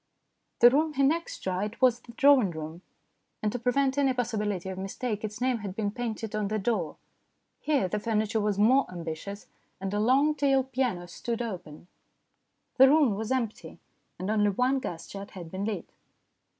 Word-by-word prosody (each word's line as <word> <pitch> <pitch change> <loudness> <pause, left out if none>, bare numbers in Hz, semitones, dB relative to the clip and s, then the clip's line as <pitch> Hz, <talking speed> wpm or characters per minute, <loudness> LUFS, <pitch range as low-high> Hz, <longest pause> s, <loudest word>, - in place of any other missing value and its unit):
The 240 +1 +9
room 305 +3 +2
he 275 - +1
next 325 +5 0
tried 190 +4 -3
was 250 -2 +4
the 240 -1 -14
drawing 275 -5 +5
room, 160 +1 -7 0.6
and 210 - +1
to 245 - -3
prevent 265 +3 +1
any 270 -2 +3
possibility 210 -6 -2
of 190 0 -5
mistake 210 +3 -3
its 210 -1 -5
name 250 -1 +1
had 200 -3 -6
been 205 -2 -1
painted 225 -2 -4
on 215 -1 -1
the 215 +2 -1
door. 200 -6 -1 0.6
Here 285 -11 +1
the 210 +3 -2
furniture 220 0 0
was 205 -1 0
more 245 +6 +4
ambitious, 175 +4 -6 0.3
and 195 +1 -4
a 205 - 0
long 270 +7 +4
tailed 270 -2 +1
piano 240 -9 -1
stood 230 +6 -4
open. 175 -9 -7 0.9
The 265 0 +8
room 290 -6 +4
was 220 +4 -4
empty, 240 -5 -2 0.4
and 185 +3 -3
only 210 -1 +3
one 250 +7 +1
gas 170 -10 -6
jet 200 0 -8
had 170 -3 -8
been 190 +2 -3
lit. 220 -1 -4
220 Hz, 175 wpm, -28 LUFS, 195-255 Hz, 0.9 s, The